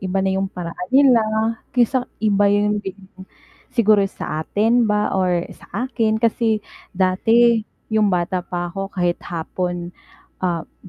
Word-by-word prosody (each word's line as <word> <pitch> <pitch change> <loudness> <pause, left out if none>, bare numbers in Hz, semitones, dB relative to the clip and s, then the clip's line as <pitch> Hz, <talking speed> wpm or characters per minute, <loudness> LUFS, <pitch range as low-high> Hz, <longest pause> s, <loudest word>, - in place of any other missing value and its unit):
iba 190 0 -2
na 190 - +1
yung 190 0 -1
paraan 180 0 -6
nila, 260 -3 +5 0.6
kaysa 245 +1 +2 0.2
iba 205 -1 +3
yun 205 0 +2
din 195 -1 -7 0.8
siguro 215 -4 +4
sa 155 - -5
atin 230 +3 +2
ba 210 0 +1
or 180 -2 +1
sa - - -17 0.2
akin. 225 -3 +1
Kasi 225 -2 +1 0.3
dati 225 +5 +3 0.3
yung 215 -1 +3
bata 180 +1 0
pa 175 -1 -3
ako 195 +1 -4
kahit 175 -2 -1
hapon, 175 +1 -4 0.5
ah, 175 -3 -1
hmm, 185 - -19
200 Hz, 145 wpm, -20 LUFS, 180-220 Hz, 0.8 s, nila